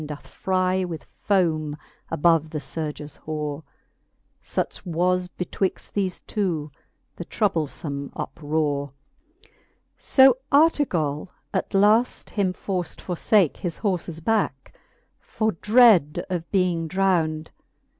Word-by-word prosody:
Doth 150 -1 -7
frie 185 0 0
with 165 -4 -6 0.2
fome 160 -6 +2 0.3
above 165 0 +3
the 155 - -4
furges 150 0 -5
horer 150 -1 -4 0.8
Such - - -3
was 180 +1 0
betwixt 180 +1 -3
thefe 190 -3 -2
two 170 -8 -2 0.5
the 175 - -6
troublefome 155 -8 -2
uprore. 145 -2 -2 0.5
XVI. - - -27 0.5
So 265 -2 +6
Artegall 195 - +2 0.2
at - - -2
length 215 +5 +3
him 195 -3 0
forft 180 -2 -4
forfake 180 -1 +2
His 175 -3 -4
horfes 175 -5 -2
backe, 205 -12 0 0.5
for 220 0 -1
dread 210 - +4
of 170 -2 -3
being 180 -4 +1
drownd. 165 -4 +1
175 Hz, 105 wpm, -24 LUFS, 155-195 Hz, 0.8 s, So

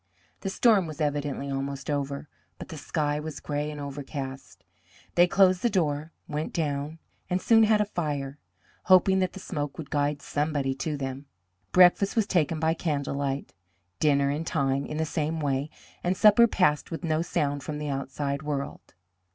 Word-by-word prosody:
The 195 - -3
storm 200 -3 +4
was 155 -1 -8
evidently 145 -2 -1
almost 140 0 -4
over, 140 0 -2 0.3
but - - -9
the 160 - -7
sky 150 0 -1
was 155 0 -6
gray 150 0 -3
and 150 -1 -7
overcast. 140 -1 -7 0.5
They 175 +1 +5
closed 185 -1 +4
the 240 - +2
door, 155 -5 0 0.2
went 150 +1 -3
down, 150 -1 -2 0.3
and 180 0 +1
soon 225 +2 +5
had 215 -1 +4
a - - +2
fire, 150 -7 -3 0.5
hoping 190 +1 +5
that 185 -1 0
the 195 - -8
smoke 145 -6 -4
would 160 -4 -8
guide 145 -1 0
somebody 145 -2 -1
to 150 +3 -3
them. 135 +1 -5 0.4
Breakfast 185 +3 +5
was 225 -3 +3
taken 165 -5 +1
by 160 0 +2
candle 150 -5 -2
light, 140 -3 -3 0.5
dinner 140 -2 +3
in 150 +3 -2
time 140 -4 0
in 150 - -5
the 160 - 0
same 160 +1 -2
way, 140 0 -1 0.3
and 180 +1 0
supper 215 +3 +7
passed 150 -9 +1
with 165 - -6
no 160 -1 +1
sound 145 -4 -1
from 150 +2 -5
the 150 0 -4
outside 140 +1 -3
world. 145 -2 -5
150 Hz, 175 wpm, -27 LUFS, 140-170 Hz, 0.5 s, supper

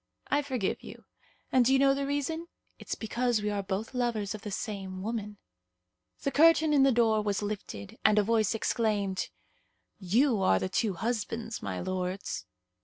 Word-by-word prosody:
I 290 - +3
forgive 255 -9 -2
you; - - -11 0.5
and 255 -1 +5
do 250 - +3
you 270 - +6
know 275 0 +5
the 275 0 -2
reason? 305 +4 -2 0.3
It's - - -4
because 235 0 0
we 210 - 0
are 205 -1 -1
both 200 +4 -4
lovers 235 -5 -1
of 215 - -7
the 210 - -6
same 190 -2 -5
woman." 210 -2 -4 0.9
The 275 - 0
curtain 320 0 +5
in 285 - +5
the 270 0 +6
door 225 -3 +3
was 205 -1 -1
lifted, 195 - -6
and 215 0 +5
a 210 - +5
voice 220 0 +2
exclaimed, 205 -4 0 0.7
"You 220 +4 +2
are 95 - +4
the 185 - -2
two 200 0 0
husbands, 225 +2 -3
my 95 -2 -4
lords." 185 - -3
220 Hz, 175 wpm, -29 LUFS, 200-250 Hz, 0.9 s, you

